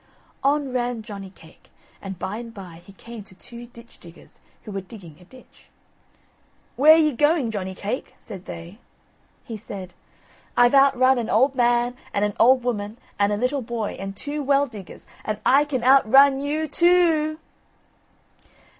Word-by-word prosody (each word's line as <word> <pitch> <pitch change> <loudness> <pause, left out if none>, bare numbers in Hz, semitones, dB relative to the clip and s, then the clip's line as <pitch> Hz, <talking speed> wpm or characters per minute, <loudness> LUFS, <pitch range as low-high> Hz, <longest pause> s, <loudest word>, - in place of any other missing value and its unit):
On 280 -1 +1
ran 240 -2 -2
Johnny 200 -2 -9
cake, 160 -4 -20 0.3
and 195 -2 -7
by 200 +5 -5
and 230 0 -8
by 180 -4 -11
he 195 - -15
came 230 +2 -11
to 190 -1 -16
two 235 +5 -12
ditch 235 0 -17
diggers 170 0 -17 0.2
who 215 - -9
were 195 -1 -4
digging 180 -6 -13
a 180 - -18
ditch. 255 +6 -19 1.1
"Where 310 +5 +7
ye 310 -2 +3
going, 295 -1 +1
Johnny 190 -3 -5
cake?" 210 +7 -5
said 190 -4 -11
they. 170 +4 -10 0.6
He 230 - -7
said: 195 -4 -9 0.6
"I've 245 +1 +5
outrun 265 -2 +4
an 230 - -4
old 260 +6 +3
man, 240 -1 +1 0.2
and 205 - +2
an 210 - -2
old 255 +1 +5
woman, 215 -3 -3 0.2
and 200 0 +2
a 205 - 0
little 255 +5 -1
boy, 230 -3 -4
and 195 0 -7
two 295 +1 -4
well 280 0 +2
diggers, 210 -8 -12 0.2
and 215 - -3
I 280 +3 +5
can 260 -5 -3
outrun 270 +2 +5
you 305 +2 -2
too 325 -1 +2
o - - -37
o!" - - -31
240 Hz, 170 wpm, -23 LUFS, 200-275 Hz, 1.1 s, Where